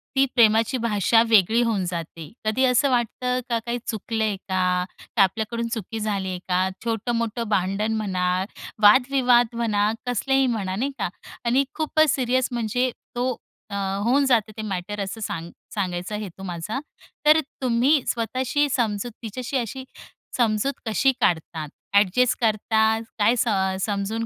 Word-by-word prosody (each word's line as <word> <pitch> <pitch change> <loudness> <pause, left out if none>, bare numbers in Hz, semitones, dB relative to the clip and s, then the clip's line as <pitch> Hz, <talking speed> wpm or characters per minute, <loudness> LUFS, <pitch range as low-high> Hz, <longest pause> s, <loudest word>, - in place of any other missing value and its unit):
ती 270 0 +5
प्रेमाची 225 +2 +4
भाषा 225 +1 +3
वेगळी 220 +2 +5
होऊन 215 -5 0
जाते. 165 -3 -6
कधी 220 +5 +1
असं 255 +2 +3
वाटतं 250 +1 0
का, 235 - +1
काय 240 +1 -1
चुकलंय 220 -1 -1
का? 180 -1 +1 0.3
का 200 - +6
आपल्याकडून 225 +4 -1
चुकी 225 0 -4
झालीये 195 -4 -2
का, 185 +1 +1 0.2
छोटं-मोठं 230 0 -1
भांडण 200 +3 0
म्हणा, 185 -4 -1 0.6
वादविवाद 245 +1 +5
म्हणा, 215 -2 +1 0.2
कसलेही 270 +2 +2
म्हणा 195 -6 -2
नाही 270 +7 -1
का 185 - -1 0.4
आणि 255 +4 +3
खूपच 310 -1 +2
सीरियस 255 -1 +1
म्हणजे 240 +2 0 0.3
तो 250 +1 0 0.4
अ, 200 - -5 0.3
होऊन 275 +4 +3
जाते 225 -4 +2
ते - - -3
मॅटर 205 +1 -4
असं 220 +3 -6
सांग 170 -3 -4 0.2
सांगायचा 185 0 -2
हेतू 195 -2 -8
माझा. 180 +7 -4 0.5
तर 305 +1 +7 0.2
तुम्ही 255 +4 +3
स्वतःशी 255 +5 0
समजूत 225 -2 -1
तिच्याशी 250 +5 -3
अशी 255 +2 -4 0.5
समजूत 230 +3 +1
कशी 225 +5 +3
काढतात, 160 -2 0 0.2
अ‍ॅडजस्ट 210 +5 +3
करतात, 220 0 +2 0.2
काय 225 +4 +4
सम 190 -5 +1
समजून 210 +2 -2
220 Hz, 140 wpm, -24 LUFS, 200-245 Hz, 0.6 s, तर